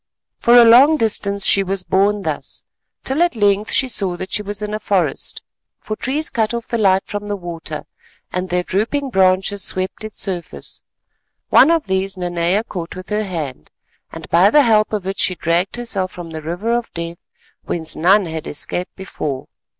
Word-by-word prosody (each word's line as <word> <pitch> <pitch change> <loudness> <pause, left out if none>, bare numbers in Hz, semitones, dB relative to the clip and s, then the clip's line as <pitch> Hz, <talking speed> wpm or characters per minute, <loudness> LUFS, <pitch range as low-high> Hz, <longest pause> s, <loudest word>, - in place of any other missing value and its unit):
For 235 - +4
a 240 -1 +9
long 265 +7 +7
distance 200 -4 -1
she 200 - +5
was 195 -1 -1
borne 200 +2 +1
thus - - -5 0.4
till 270 +5 -1
at 345 -5 +2
length 205 0 +2
she 265 - +3
saw 195 -7 0
that 185 +2 -7
she - - +1
was 205 +1 -4
in 210 0 -4
a 215 - -2
forest, 180 -10 -1 0.3
for 215 - -5
trees 285 +7 -2
cut 225 0 0
off 235 -1 -5
the 235 - -1
light 195 -2 +3
from 205 0 -5
the 205 - -2
water, 165 -4 -6 0.5
and 180 0 -2
their 180 0 0
drooping 245 +10 -1
branches 190 +1 +2
swept 185 +3 -1
its 215 -1 -6
surface. 180 -4 -5 0.7
One 275 - +7
of 330 -2 +2
these 190 0 -1
Nanea 175 +3 0
caught 175 -7 -7
with 185 0 -9
her 210 0 -1
hand, 150 - -6 0.4
and - - -9
by 180 +4 +5
the 295 +6 +5
help 215 -3 +3
of 210 -4 -3
it 195 +1 -4
she 185 - +1
dragged 170 +3 0
herself 210 -6 -2
from 175 -2 -9
the 160 -1 -6
River 175 +9 -2
of 240 -1 -3
Death 170 0 -5 0.5
whence 160 -2 -3
none 190 +4 +4
had 160 -2 -5
escaped 175 +4 -3
before. 150 -8 -5
195 Hz, 190 wpm, -19 LUFS, 180-215 Hz, 0.7 s, a